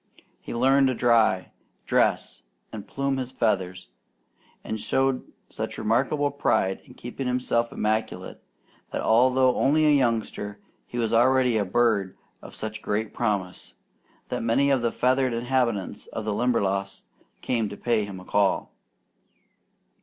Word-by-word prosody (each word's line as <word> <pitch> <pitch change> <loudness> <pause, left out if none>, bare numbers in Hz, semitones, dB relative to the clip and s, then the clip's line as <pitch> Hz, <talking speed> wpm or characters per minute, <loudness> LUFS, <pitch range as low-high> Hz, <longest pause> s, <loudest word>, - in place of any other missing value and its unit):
He - - -9
learned 135 +3 +4
to 130 - 0
dry, 115 -6 +2 0.3
dress, - - +1 0.3
and 105 -2 -7
plume 140 0 -1
his 130 -1 -4
feathers, 95 -7 -1 0.7
and 110 - -4
showed 135 +4 0 0.2
such - - -5
remarkable 140 +6 +1
pride 95 -8 0
in - - -16
keeping 125 +2 -6
himself 120 -2 0
immaculate, 110 +1 -2 0.5
that - - -3
although 125 +2 +4
only 155 +3 +3
a 150 - +5
youngster, 115 -6 0 0.3
he 120 - -7
was 115 -1 0
already 125 +1 +4
a 105 -2 +1
bird 100 -2 +1 0.2
of - - -12
such 110 0 -6
great 105 +1 -2
promise, 100 -6 -3 0.5
that - - -2
many 115 +5 +2
of 135 -3 +2
the 115 -1 0
feathered 130 0 +1
inhabitants 120 -4 -1
of 110 - -6
the 110 - -1
Limberlost 100 -5 -1 0.4
came 115 -4 -1
to 100 - -8
pay 115 -3 +1
him 100 -2 -7
a 95 - -13
call. 100 0 +1
115 Hz, 140 wpm, -25 LUFS, 105-130 Hz, 0.7 s, a